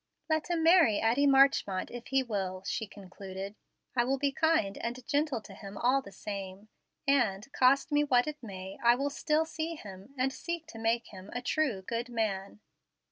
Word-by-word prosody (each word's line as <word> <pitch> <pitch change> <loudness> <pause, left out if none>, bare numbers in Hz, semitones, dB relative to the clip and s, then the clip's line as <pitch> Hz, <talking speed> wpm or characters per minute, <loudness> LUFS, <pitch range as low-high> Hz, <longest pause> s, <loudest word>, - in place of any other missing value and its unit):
"Let 315 +2 +1
him 335 -2 0
marry 325 - +6
Addie 245 +6 +3
Marchmont 270 -8 +4
if 240 0 -8
he 270 0 +2
will," 190 -5 -3
she 220 +2 -2
concluded. 195 0 -8 0.4
"I 240 - +4
will 265 +3 0
be 280 +1 +1
kind 295 -10 +2
and 240 +1 -4
gentle 290 -5 0
to 205 - -12
him 195 0 -9
all 255 +5 +3
the 230 - -12
same, 195 0 -7 0.4
and, 235 -7 +2
cost 265 +4 +4
me 295 0 +4
what 250 -4 +3
it 300 -1 -5
may, 190 -4 -8
I 235 0 +6
will 280 +3 -1
still 305 +2 +1
see 325 +1 -4
him, 200 +1 -11
and 265 +1 +1
seek 340 -1 -4
to 225 - -9
make 230 +1 0
him 190 0 -11
a 245 - -3
true, 255 -9 0
good 235 +4 -3
man." 210 -3 -2
240 Hz, 190 wpm, -30 LUFS, 200-280 Hz, 0.4 s, marry